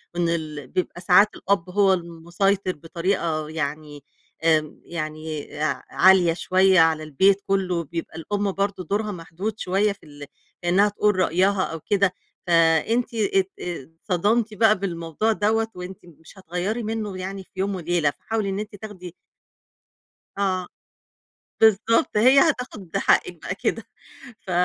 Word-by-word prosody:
وإن 170 -1 +1
ال 155 -5 -4
بيبقى 175 +2 -3
ساعات 190 +4 +5
الأب 190 -2 -1
هو 195 0 +3
المُسيطر 175 +3 -1
بطريقة 165 -1 -2
يعني 150 -2 -5 0.4
آمم، 155 -2 +1
يعني 155 -2 -5 0.2
أع 155 - -1
عالية 185 -3 +5
شوية 185 +1 +3
على 160 -1 +3
البيت 190 +7 +3
كلّه، 185 -3 0
بيبقى 165 +1 -6
الأم 205 +4 -2
برضه 195 -1 -2
دورها 210 +5 -2
محدود 185 +5 -6
شوية 200 +3 +1
في 200 - -11
ال 145 -1 -11 0.4
إنها 195 +4 +4
تقول 210 0 +1
رأيها 185 +2 +2
أو 165 - -4
كده، 200 +1 +1 0.3
فأنتِ 170 +9 +3
ات 195 -3 +1
آآ، 170 -5 -6 0.2
اتصدمتِ 210 +5 +1
بقى 215 -2 +3
بالموضوع 170 +3 -1
دَوَّة 220 +1 +1
وأنتِ 180 +1 -9
مش 165 +3 -17
هتغيّري 190 +6 -3
منه 215 -3 -4
يعني 190 +1 -5
في - - -32
يوم 195 0 0
وليلة، 170 -3 0
فحاولي 220 +2 -3
إن 195 +1 -2
أنت 210 0 -6
تاخدي 190 -4 -9 1.2
آه، 185 -2 0 0.9
بالضبط 220 0 +3
هي 260 +5 +6
هتاخد 250 - -1
حقِك - - +2
بقى - - -3
كده. - - -2 0.6
ف 185 - -10
185 Hz, 140 wpm, -23 LUFS, 165-205 Hz, 1.2 s, هي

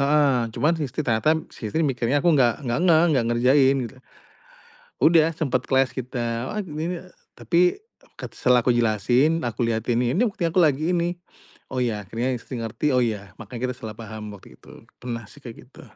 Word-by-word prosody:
heeh. 145 -1 +3 0.2
Cuman, 155 +3 +2
si - - 0
istri 135 +4 -4
ternyata, 120 +8 +2 0.2
si 110 - -6
istri 160 0 0
mikirnya 130 +1 0
aku 170 - +5
nggak 130 -1 +2
nggak 120 +4 0
ngeh, 160 0 +6
nggak 120 -3 +2
ngerjain, 130 +3 +4
gitu. 130 - -14 1.1
Udah, 165 0 +5
sempet, 130 -6 -1
clash 130 -1 +2
kita, 120 -1 -3
"Wah, 210 - -1
g 185 - -12
gini." 165 +4 -3 0.4
Tapi, 170 0 0 0.6
ket - - -6
setelah 125 -1 +3
aku 125 - +3
jelasin, 120 +8 +2
aku 120 +1 -2
lihatin, 115 +1 0
"Ini 175 - +1
buktinya 170 -5 -2
aku 185 - +4
lagi 155 +3 +2
ini." 175 0 -1 0.6
Oh, 130 - -1
ya, 105 -4 -2
akhirnya 115 +5 -2
istri 120 0 -7
ngerti. 130 +6 -1
“Oh 125 - +4
ya." 100 -4 -4
makanya 125 +3 -5
kita - - -13
salah 110 -2 -7
paham 110 -1 -8
waktu 95 - -17
itu. - - -15 0.2
Pernah 115 -2 -5
sih, 145 - -16
kayak 120 0 -11
gitu. - - -16
130 Hz, 190 wpm, -23 LUFS, 115-155 Hz, 1.1 s, ngeh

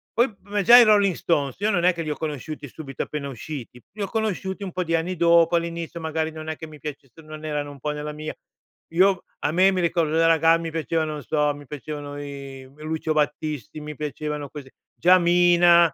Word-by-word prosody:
Poi 235 0 +2
ma 205 +1 -1
già 235 +5 +9
i 245 - +10
Rolling 205 -3 +4
Stones, 145 -6 -1
io 210 +2 +1
non 175 -3 +1
è 180 - +5
che 170 - -5
li 155 - -4
ho 150 - -1
conosciuti 150 -1 -5
subito 135 -2 -6
appena 150 -2 -5
usciti, 125 -2 -8
li 210 +1 -9
ho 200 - -1
conosciuti 200 -2 -2
un 190 - -5
po' 180 0 -2
di 165 - +1
anni 175 +2 -2
dopo, 170 0 +5
all'inizio, 170 0 -4
magari, 160 0 -2
non 155 0 -8
è 160 - -3
che 160 - -9
mi 150 -1 -13
piacesser 145 0 -9
non 155 0 -10
erano 145 -1 -3
un 140 - -13
po' 150 +3 -2
nella 150 0 -5
mia 155 +1 -6 0.6
io 185 +1 +3 0.2
a 145 - 0
me, 185 +3 +5
mi 185 -1 0
ricordo 165 -2 +1
da 165 0 +4
raga 165 0 +5
mi 165 0 -4
piacevano, 160 -1 -1
non 150 -1 -7
so, 150 +2 +1
mi 145 0 -12
piacevano 145 0 -7
i, 140 -2 -8
v 140 +3 -22
Lucio 155 0 -2
Battisti, 150 -3 -2
mi 150 0 -7
piacevano, 150 0 -4
così. 140 -3 -10 0.2
Già 180 +2 +6
Mina 175 -1 +5
160 Hz, 220 wpm, -24 LUFS, 150-175 Hz, 0.6 s, i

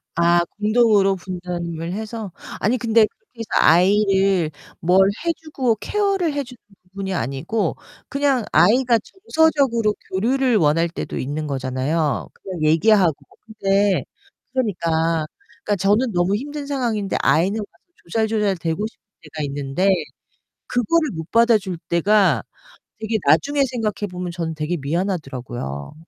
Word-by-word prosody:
아. 170 +1 +4 0.2
공동으로 210 -3 +3
분담을 175 -2 -5
해서? 220 -2 -5 0.3
아니 235 +5 +1
근데 225 -2 +4
그렇게 335 - -18
해서 225 - -5 0.2
아이를 190 -1 +3 0.3
뭘 180 +3 +3 0.3
해 335 - +3
주고 270 -7 -1
케어를 390 -6 0
해 285 -1 -1
주는 250 -1 -13 0.3
부분이 190 +1 -5
아니고 160 - -2 0.3
그냥 280 -4 +1
아이가 230 - +4
정서적으로 280 - +1 0.2
교류를 245 +4 +2
원할 165 +1 +2
때도 170 - -5
있는 150 +3 -3
거잖아요 135 +3 -1
그냥 180 -5 -7
얘기하고. 165 +2 +4 0.3
근데 200 -2 +1 0.5
그러니까 165 -9 0 0.4
그러니까 205 - 0
저는 210 +6 +2
너무 175 +3 +2
힘든 290 +4 -5
상황인데 235 -8 -1
아이는 175 +10 +2
막 205 - -4 0.4
조잘조잘대고 205 -3 -1
싶을 - - -20 0.2
때가 155 0 -6
있는데 140 +6 -1 0.8
그거를 305 +7 +1
못 160 0 -7
받아줄 220 -6 +3
때가 195 +3 +3 0.6
되게 220 0 -1
나중에 280 - +3
생각해 225 -5 -2
보면 180 -1 -5
저는 165 -2 -4
되게 155 +3 -2
미안하더라고요. 135 - -4
195 Hz, 310 characters per minute, -21 LUFS, 165-230 Hz, 0.8 s, 아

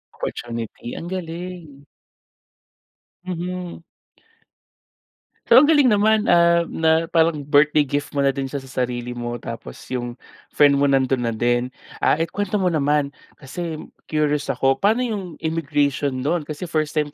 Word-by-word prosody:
Opportunity. 115 -1 -6
Ang 170 - -6
galing. 170 -4 -7 1.4
Mhm. 180 -1 -5 1.6
So, - - +3
ang 295 +2 +4
galing 290 -7 +5
naman, 215 +1 +3
ah, 170 -3 +4
na 160 0 +1
parang 160 -3 +1
birthday 145 +1 +4
gift 145 +2 -2
mo 140 - +2
na 135 - +3
din 135 -1 -4
siya 140 - -4
sa 130 -1 -4
sarili 120 0 -3
mo. 120 0 -4
Tapos 60 - -8 0.2
yung 120 0 -4 0.3
friend 145 -1 +4
mo 140 - +3
nandun 135 -2 +2
na 115 - -1
din. 120 +2 +1 0.3
Ah, - - +3
ikwento 200 +5 -1
mo 185 -2 +1
naman 145 -1 +1 0.2
kasi 155 +3 -6 0.3
curious 150 -1 0
ako. 135 0 +1
Paano 225 +5 +2
yung 195 -7 -5
immigration 140 -4 -1
nun, 170 +2 +1
kasi 155 +4 -5
first 155 -2 -2
time 150 -1 0
150 Hz, 145 wpm, -22 LUFS, 135-175 Hz, 1.6 s, galing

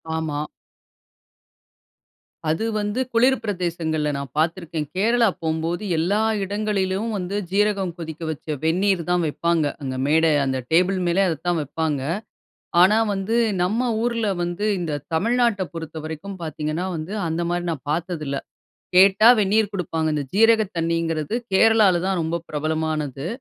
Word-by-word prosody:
ஆமா. 155 -2 -2 2.1
அது 160 +7 0
வந்து 210 +3 -2
குளிர் 255 +3 +4
பிரதேசங்கள்ல 170 -6 -1
நான் 140 -2 -5
பார்த்துருக்கேன். 165 -1 -1
கேரளா 230 +4 +3
போம்போது 165 +4 -2
எல்லா 180 +6 +1 0.2
இடங்களிலும் 200 +1 -1
வந்து 185 +1 -4 0.2
சீரகம் 200 -3 +1
கொதிக்க 160 -1 -7
வச்ச 155 0 -4
வெந்நீர் 185 +3 +2
தான் 175 -1 +2
வைப்பாங்க. 165 +1 0 0.2
அங்க 130 -2 -4
மேடை 160 +2 +4
அந்த 130 -1 -1
டேபிள் 180 +4 +3
மேலே 175 +3 +2
அதைதான் 175 +1 -1
வப்பாங்க. 150 0 -2 0.8
ஆனா 200 +4 +6 0.2
வந்து, 195 +4 -1 0.3
நம்ம 230 +7 0
ஊர்ல 230 -2 0 0.2
வந்து 175 +4 -2
இந்த 155 -4 -2
தமிழ்நாட்ட 230 +3 +2
பொறுத்தவரைக்கும் 160 +3 -6
பார்த்தீங்கன்னா 155 +2 -3
வந்து, 160 +5 -5
அந்தமாரி 170 +2 -1
நான் 145 -6 -6
பார்த்ததில்ல. 155 -4 -2 0.6
கேட்டா 195 +4 +7
வெந்நீர் 210 +1 +2
கொடுப்பாங்க. 165 -4 -2
இந்த 145 -1 -1
ஜீரக 225 +1 +5
தண்ணீங்கிறது 165 0 -1 0.2
கேரளால 210 -3 +5
தான் 190 -1 0
ரொம்ப 160 +1 -1
பிரபலமானது. 155 -2 -2
170 Hz, 125 wpm, -23 LUFS, 160-200 Hz, 2.1 s, கேட்டா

